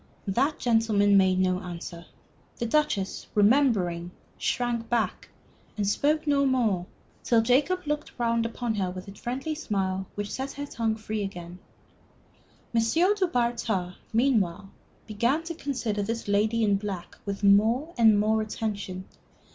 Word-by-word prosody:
That 260 +10 +1
gentleman 220 -4 +3
made 190 -1 +4
no 185 -1 +2
answer. 175 -2 -8 0.5
The 235 - -2
Duchess, 235 -7 0
remembering, 205 -7 +3 0.3
shrank 240 -2 -1
back, 230 -5 -1 0.5
and 205 -2 0
spoke 300 +9 +1
no 285 -2 +3
more, 225 -10 +1 0.4
till 230 -2 +3
Jacob 285 +10 +2
looked 295 0 -2
round 235 -1 +1
upon 230 0 -2
her 195 -4 -1
with 185 +1 -8
a 195 - -8
friendly 255 +9 -4
smile 190 - -2
which 205 0 -4
set 265 +1 -4
her 285 0 -5
tongue 225 -5 -1
free 220 -1 -4
again. 180 -3 -6 1.1
M. 230 - +3
du 365 - +2
Bartas, 230 - -1 0.2
meanwhile, 205 -6 +1 0.3
began 235 +9 0
to 335 +1 -5
consider 250 -9 -2
this 230 +2 -3
lady 215 +3 +2
in 205 -2 +3
black 195 -4 -6
with 200 0 -5
more 225 +10 +4
and 220 -3 +5
more 220 +1 +2
attention. 205 -4 -4
220 Hz, 140 wpm, -27 LUFS, 195-250 Hz, 1.1 s, and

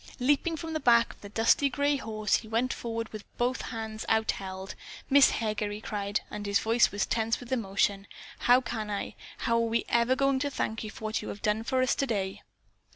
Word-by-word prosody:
Leaping 290 +6 +2
from 325 0 -5
the 315 - -1
back 235 -4 +4
of - - -25
the 205 - -9
dusty 230 +6 +3
gray 285 +2 +1
horse, 215 -5 0
he 220 - -9
went 230 +4 0
forward 230 -1 -4
with 215 -1 -8
both 245 +1 0
hands 220 -2 -5
outheld. 195 -4 -1 0.4
"Miss 280 0 +8
Heger," 215 -2 -1
he 205 0 -5
cried, 205 -1 -2
and 205 -1 -5
his 200 0 +3
voice 225 +3 +3
was 205 0 0
tense 225 0 0
with 245 0 -11
emotion, 200 -4 0 0.3
"how 245 +1 +5
can 225 -4 -4
I, 200 -1 -3 0.3
how 230 - +3
are - - +3
we 230 0 0
ever 235 +2 +3
going 275 0 +2
to 285 +1 -1
thank 225 -5 -3
you 215 - -5
for 220 - -11
what 215 0 -1
you - - -7
have 200 - -7
done 210 +1 +1
for 255 +2 +1
us 255 - +2
today?" 205 -8 -2
225 Hz, 215 wpm, -29 LUFS, 210-255 Hz, 0.4 s, Miss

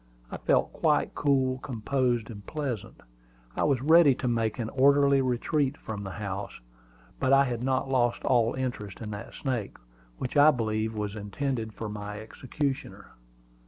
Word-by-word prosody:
I - - -4
felt - - +1
quite - - +1
cool, 130 -2 +1
composed, 120 -1 -1
and 100 -2 -9
pleasant. 135 - -5 0.5
I - - +1
was 135 -4 +1
ready 160 -2 +6
to 130 - -3
make 115 -2 0
an 115 -3 -3
orderly 140 +1 +4
retreat 135 +3 0
from 105 -2 -6
the 95 - -5
house. 100 -5 -5 0.6
But 130 - +2
I 135 0 +7
had 120 -3 -3
not 130 +1 0
lost 120 -3 +1
all 120 -2 +2
interest 120 -7 -4
in 110 -2 -6
that 105 - -8
snake, 125 -7 -3 0.4
which 125 - -5
I 145 +1 +8
believed 110 -4 -1
was 105 -1 -3
intended 110 +2 -3
for 110 - -5
my 105 0 -6
executioner. 135 +5 -4
125 Hz, 160 wpm, -28 LUFS, 110-135 Hz, 0.6 s, I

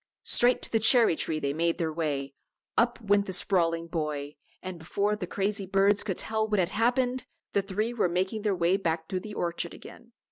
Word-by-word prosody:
Straight 245 +1 +4
to - - +1
the 225 - +2
cherry 220 -4 +5
tree 160 0 -1
they 140 -1 -1
made 165 +2 0
their 160 -2 -2
way, 145 -4 -2 0.4
up 240 +1 +2
went 205 -1 +2
the 190 - -4
sprawling 170 -3 +2
boy, 150 -3 -4 0.2
and 185 -2 -7
before 200 +6 -1
the 195 -4 -5
crazy 200 +1 -2
birds 195 +1 +3
could 190 -4 -3
tell 220 0 -1
what 210 -1 0
had 175 -1 +1
happened, 250 +2 0 0.3
the 200 - +3
three 210 +4 -2
were 215 -7 +1
making 190 +5 -1
their 205 -2 0
way 175 +2 +2
back 160 -4 -2
through 185 - -2
the 210 +2 -9
orchard 170 -1 -3
again. - - -14
190 Hz, 205 wpm, -28 LUFS, 165-215 Hz, 0.4 s, cherry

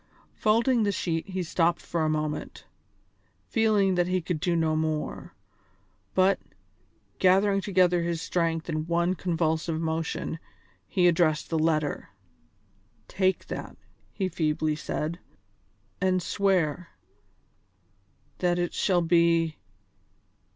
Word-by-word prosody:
Folding 230 +3 +2
the 205 -1 +2
sheet 165 -2 -2
he 185 -1 -2
stopped 170 0 +1
for 170 - -3
a 155 - +1
moment, 150 -1 -3 0.8
feeling 210 -4 +2
that 175 -1 +1
he 185 0 +1
could 170 -1 -3
do 175 +1 0
no 160 -1 +1
more; 155 -1 -3 0.8
but, 190 +1 +4 0.8
gathering 195 +2 +4
together 180 -3 +3
his 170 -1 -2
strength 165 -1 -1
in 155 -1 -3
one 170 +1 +1
convulsive 165 -2 -1
motion, 160 0 -3 0.5
he 180 -2 +3
addressed 165 -3 +2
the 160 - +1
letter. 155 -2 0 1.0
"Take 190 0 0
that," - - -7 0.3
he 190 - -2
feebly 155 -2 0
said, 155 +2 -4 0.8
"and 185 -1 +1
swear... 180 -5 0 1.5
that 175 -1 +1
it 175 -1 -1
shall 180 -3 +2
be 170 -1 +3
170 Hz, 115 wpm, -27 LUFS, 160-185 Hz, 1.5 s, but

